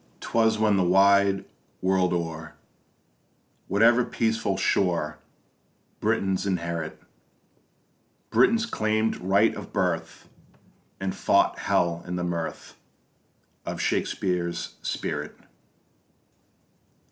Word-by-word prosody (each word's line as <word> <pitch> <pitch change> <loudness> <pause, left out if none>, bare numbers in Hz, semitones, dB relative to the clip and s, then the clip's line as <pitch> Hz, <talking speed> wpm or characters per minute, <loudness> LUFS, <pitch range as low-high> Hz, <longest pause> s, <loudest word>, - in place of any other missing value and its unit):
'Twas 110 -1 +1
when 105 -2 +3
the 95 - +3
wide 100 +1 +4 0.3
world 95 -1 +2
o'er, 80 -2 -4 1.1
Whatever 115 +5 +4
peaceful 110 -4 -1
shore 85 -5 0 0.8
Britons 95 0 0
inherit, 85 -4 -3 1.3
Britons 225 - +4
claim'd 110 - 0
right 100 +4 +2
of - - -9
birth, 90 -5 -2 0.7
And 95 0 -2
fought - - +2
hell 85 -1 +1
in 90 - -3
the 90 - -2
mirth 85 -2 -4 0.9
Of - - -5
Shakespeare's 90 -2 -1
spirit. - - -4
95 Hz, 90 wpm, -26 LUFS, 85-110 Hz, 1.3 s, wide